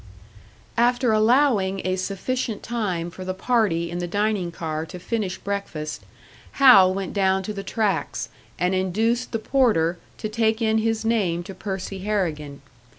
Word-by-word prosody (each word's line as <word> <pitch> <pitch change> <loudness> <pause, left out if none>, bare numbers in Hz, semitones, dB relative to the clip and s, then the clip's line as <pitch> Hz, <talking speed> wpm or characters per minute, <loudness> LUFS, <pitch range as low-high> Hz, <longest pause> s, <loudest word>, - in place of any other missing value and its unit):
After 245 0 +3
allowing 215 -4 +3
a 185 0 +1
sufficient 205 +4 -3
time 185 -8 -2
for 185 - -8
the 185 0 -3
party 190 -7 +1
in 175 - -3
the 175 - -3
dining 205 -1 0
car 160 -2 -4
to 165 - -8
finish 195 0 -3
breakfast, 200 -7 -4 0.5
Hal 205 -9 +7
went 190 -1 -4
down 190 -1 +2
to 210 - -4
the 200 - -5
tracks, 200 -6 -1 0.3
and 180 +2 +1
induced 220 +7 0
the 225 - 0
porter 215 -9 +2 0.2
to - - -3
take 220 0 +1
in 220 -1 +2
his 225 0 -1
name 190 -7 +1
to 195 +2 -8
Percy 190 0 -5
Harrigan. 155 -9 -2
195 Hz, 155 wpm, -23 LUFS, 180-225 Hz, 0.5 s, Hal